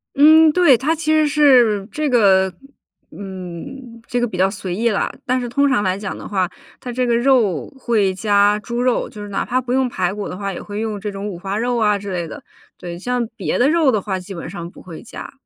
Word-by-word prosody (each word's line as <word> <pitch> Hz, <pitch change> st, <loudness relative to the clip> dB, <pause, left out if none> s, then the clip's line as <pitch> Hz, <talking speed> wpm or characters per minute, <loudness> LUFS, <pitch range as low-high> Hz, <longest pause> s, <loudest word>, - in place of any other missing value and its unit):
嗯， 310 Hz, +2 st, +7 dB
对。 320 Hz, -8 st, +5 dB
它 300 Hz, +6 st, 0 dB
其 325 Hz, -1 st, -6 dB
实 310 Hz, -1 st, +4 dB
是 250 Hz, -9 st, +4 dB
这 305 Hz, -2 st, -1 dB
个 190 Hz, -6 st, +4 dB, 0.6 s
嗯， 200 Hz, +6 st, -9 dB
这 245 Hz, -, -1 dB
个 240 Hz, -, +1 dB
比 185 Hz, -, -7 dB
较 190 Hz, +1 st, +3 dB
随 190 Hz, -3 st, -5 dB
意 230 Hz, +4 st, +1 dB
了， 205 Hz, -, -1 dB
但 255 Hz, +1 st, +1 dB
是 245 Hz, -, -4 dB
通 280 Hz, +4 st, +2 dB
常 245 Hz, -6 st, +1 dB
来 185 Hz, 0 st, 0 dB
讲 200 Hz, -1 st, -5 dB
的 -, -, -9 dB
话， 190 Hz, -3 st, 0 dB, 0.3 s
它 250 Hz, -, -6 dB
这 250 Hz, +1 st, -1 dB
个 235 Hz, -, +2 dB
肉 240 Hz, -, +2 dB
会 215 Hz, -7 st, +1 dB
加 205 Hz, +1 st, +2 dB
猪 235 Hz, +3 st, -4 dB
肉， 250 Hz, -1 st, +1 dB
就 210 Hz, -, -10 dB
是 205 Hz, -, -8 dB
哪 200 Hz, -, -2 dB
怕 255 Hz, +1 st, 0 dB
不 245 Hz, 0 st, -6 dB
用 260 Hz, 0 st, +2 dB
排 185 Hz, -5 st, -2 dB
骨 205 Hz, 0 st, -5 dB
的 180 Hz, -, -6 dB
话， 200 Hz, -1 st, -3 dB
也 -, -, -7 dB
会 205 Hz, 0 st, -6 dB
用 215 Hz, -2 st, -3 dB
这 210 Hz, 0 st, -4 dB
种 200 Hz, +1 st, -5 dB
五 180 Hz, -, -7 dB
花 195 Hz, +2 st, -3 dB
肉 240 Hz, +2 st, 0 dB
啊 210 Hz, -2 st, +2 dB
之 200 Hz, -1 st, -7 dB
类 175 Hz, -2 st, -3 dB
的。 -, -, -10 dB, 0.3 s
对， 175 Hz, -1 st, -7 dB
像 245 Hz, +2 st, -1 dB
别 -, -, -1 dB
的 255 Hz, +3 st, +3 dB
肉 320 Hz, -3 st, +3 dB
的 215 Hz, -4 st, 0 dB
话 190 Hz, -2 st, -3 dB
基 190 Hz, +2 st, -9 dB
本 170 Hz, -1 st, -7 dB
上 170 Hz, -2 st, -7 dB
不 -, -, -15 dB
会 170 Hz, -3 st, -10 dB
加， -, -, -9 dB
215 Hz, 260 characters per minute, -19 LUFS, 195-250 Hz, 0.6 s, 嗯